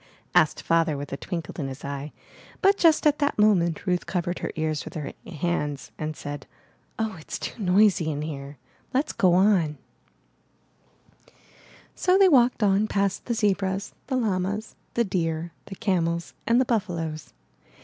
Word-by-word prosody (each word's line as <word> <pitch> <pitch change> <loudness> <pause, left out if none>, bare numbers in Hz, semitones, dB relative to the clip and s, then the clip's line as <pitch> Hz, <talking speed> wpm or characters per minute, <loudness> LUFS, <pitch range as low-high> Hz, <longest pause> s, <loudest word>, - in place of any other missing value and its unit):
asked 160 -4 +3
Father 165 -3 +2
with 140 0 -6
a - - 0
twinkle 165 +1 -5
in 140 - -2
his 135 0 -8
eye, 140 +1 -5 0.5
but 395 -1 +5
just 330 -5 +4
at 300 -1 +4
that 285 0 +1
moment 185 -7 +3
Ruth 180 -2 0
covered 175 -1 -2
her - - -3
ears 155 -1 -1
with - - -10
her 150 -3 -4
hands 150 - -2
and 155 0 -3
said, 145 -1 -6 0.5
''Oh, 220 -7 -3
it's - - -5
too - - -6
noisy 195 -2 +4
here. 145 -2 -6 0.4
Let's 285 +4 +1
go 180 -2 +3
on/' 180 -6 +3 2.2
So 365 +1 +3
they 390 -1 +7
walked 250 -6 +4
on 200 +1 +3
past 200 -2 0
the 235 - -1
zebras, 200 -2 0
the 265 - -1
llamas, 205 -2 -1 0.2
the 235 - +3
deer, 165 -4 -2
the 195 - -8
camels, 170 -4 -1
and 235 +2 +4
the 260 - +3
buffaloes. 170 -9 -2
180 Hz, 155 wpm, -25 LUFS, 155-215 Hz, 2.2 s, they